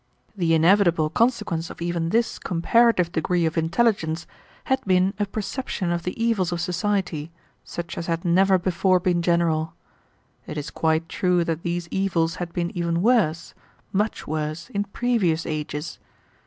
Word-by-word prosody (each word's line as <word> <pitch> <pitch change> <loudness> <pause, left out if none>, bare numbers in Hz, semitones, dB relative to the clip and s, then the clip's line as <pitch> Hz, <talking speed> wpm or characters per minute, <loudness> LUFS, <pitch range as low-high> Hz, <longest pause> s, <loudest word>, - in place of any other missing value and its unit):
The 170 -4 +2
inevitable 165 -2 +4
consequence 210 -8 0
of - - -10
even 170 -1 -1
this 230 +5 0
comparative 185 +1 +2
degree 175 +1 0
of 160 - -1
intelligence 165 -1 +1 0.4
had 265 0 0
been 185 0 +3
a 205 - 0
perception 205 -3 -3
of 170 0 -1
the 180 +5 -5
evils 225 -6 +1
of 175 - -2
society, 180 -3 -1 0.3
such 170 0 -6
as 165 - -5
had 165 0 -2
never 190 +2 +4
before 185 +1 +2
been 175 -1 +1
general. 165 -2 +1 0.7
It - - -6
is 150 0 -5
quite 160 0 0
true 180 +1 +1
that 165 -1 -2
these 175 0 -3
evils 175 -3 0
had 175 -1 -4
been 175 +1 -3
even 170 0 0
worse, 205 -9 +2 0.4
much 210 +3 -1
worse, 155 +2 -4
in 200 0 -1
previous 195 -7 0
ages. 150 -1 -4
175 Hz, 155 wpm, -24 LUFS, 165-195 Hz, 0.7 s, inevitable